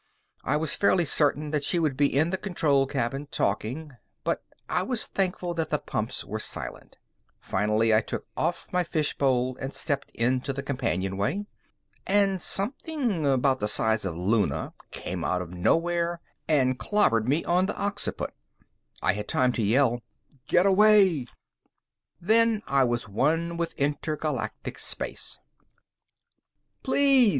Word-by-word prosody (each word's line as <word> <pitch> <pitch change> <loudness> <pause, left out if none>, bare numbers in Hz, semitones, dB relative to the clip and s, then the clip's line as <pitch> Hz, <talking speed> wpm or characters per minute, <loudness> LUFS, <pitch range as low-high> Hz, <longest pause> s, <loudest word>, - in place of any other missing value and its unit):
I 150 - +1
was 155 -1 -1
fairly 185 -3 +3
certain 150 0 +2
that 150 -2 0
she 175 - +2
would 155 -5 +1
be 145 +1 +3
in 150 +5 +1
the 190 - 0
control 150 -9 +1
cabin, 135 +2 -2
talking, 130 +8 -2 0.3
but - - -1 0.3
I 180 - +1
was 240 +3 -1
thankful 180 -2 -1
that 165 -1 -2
the 150 - +1
pumps 110 -2 -4
were 110 +2 -4
silent. - - -5 0.4
Finally, 105 +3 +1
I 110 - +5
took - - -5
off - - -1
my 180 0 +2
fishbowl 135 -6 0
and 135 +1 -6
stepped 145 -3 -2
into 130 +3 0
the 140 +1 -4
companionway. 100 - -1 0.6
And 195 -2 +2
something 230 - 0
about 135 0 +2
the 105 - 0
size 110 +1 +3
of 90 -4 -3
Luna 100 +4 0 0.2
came 90 -2 -5
out 90 - 0
of 90 0 -11
nowhere 170 - +1 0.3
and 130 -4 +2
clobbered 120 - +2
me 150 +5 +1
on 180 +2 +2
the - - -3
occiput. 205 0 -3 0.7
I - - +3
had 105 +1 -5
time 125 -1 +2
to - - -1
yell, 120 +3 +2 0.5
"Get 180 +2 +4
away!" 195 - +5 0.9
Then 220 +3 +3
I 135 -1 +3
was 120 -1 -1
as 110 - -14
one 165 +11 0
with 170 0 -3
intergalactic 150 +2 -3
space. - - -4 1.5
_Please! 270 -3 +5
145 Hz, 145 wpm, -27 LUFS, 120-180 Hz, 1.5 s, I